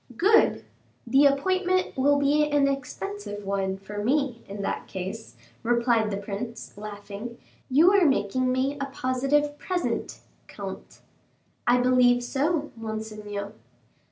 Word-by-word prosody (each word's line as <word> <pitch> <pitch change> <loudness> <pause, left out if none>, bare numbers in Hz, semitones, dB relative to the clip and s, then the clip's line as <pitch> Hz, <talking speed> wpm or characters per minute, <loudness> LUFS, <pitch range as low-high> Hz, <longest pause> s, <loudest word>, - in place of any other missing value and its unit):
"Good! 420 - +4 0.4
the 270 +4 +5
appointment 370 +6 +1
will 285 +2 +3
be 295 +2 +3
an 290 -1 +3
expensive 205 -6 -4
one 195 -1 -1
for 205 +2 -6
me, 265 -1 0
in 200 0 -6
that - - -3
case," 190 +4 -6 0.3
replied 235 -2 +2
the 200 - -2
prince, 205 +4 -6
laughing. 205 +2 -8 0.3
"You 310 +8 +6
are 395 -3 +5
making 255 0 +1
me 265 +3 0
a - - 0
positive 275 +3 0
present, 365 -1 -2 0.3
comte." - - -8 0.7
"I 245 +1 +5
believe 245 -1 +4
so, 295 +4 -1
monseigneur." 215 -2 -5
245 Hz, 125 wpm, -26 LUFS, 210-285 Hz, 0.7 s, You